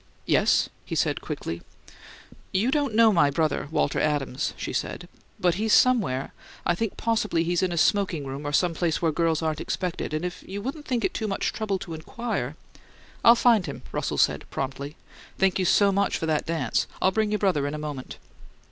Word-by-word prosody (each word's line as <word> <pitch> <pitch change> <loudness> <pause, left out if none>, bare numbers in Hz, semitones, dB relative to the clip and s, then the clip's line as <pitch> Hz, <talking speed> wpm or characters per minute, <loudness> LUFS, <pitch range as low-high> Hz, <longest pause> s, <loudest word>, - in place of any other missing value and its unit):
"Yes?" - - +3 0.2
he - - -5
said, - - +1
quickly. 85 +1 -5 0.9
"You 220 +7 +1
don't 285 -6 0
know 225 -1 +6
my 155 -5 +4
brother, 155 0 0
Walter 160 - 0
Adams," 145 -4 -1
she - - -4
said. - - -3 0.3
"But 180 -1 +3
he's 220 -1 +2
somewhere 205 - +3 0.3
I 175 - +3
think 210 +4 -3
possibly 215 -7 +1
he's 175 +1 0
in 185 -1 +1
a 170 - -2
smoking 180 -4 +2
room 135 +2 -5
or - - -2
some 175 +4 +2
place 165 -1 0
where 165 -2 +1
girls 165 0 +1
aren't 155 -1 -1
expected, 180 -3 -3
and 155 +3 -2
if 180 - -5
you 195 +2 -5
wouldn't 275 +7 -5
think 245 -3 0
it - - -1
too 220 - -2
much 195 - -1
trouble 215 -3 -1
to 170 - -7
inquire 160 - -4 0.3
" - - -26
"I'll 235 - +8
find 230 -5 +4
him," - - -7
Russell - - -2
said, - - +2
promptly. 140 +2 -4 0.4
"Thank 190 0 +2
you 185 - +1
so 200 +2 +4
much 200 0 +1
for - - -3
that 155 0 0
dance. 160 -8 0
I'll 190 - +3
bring 215 +1 +1
your 210 - +2
brother 180 -9 +1
in 145 - -3
a - - -4
moment." 150 -4 -6
175 Hz, 200 wpm, -26 LUFS, 150-210 Hz, 0.9 s, I'll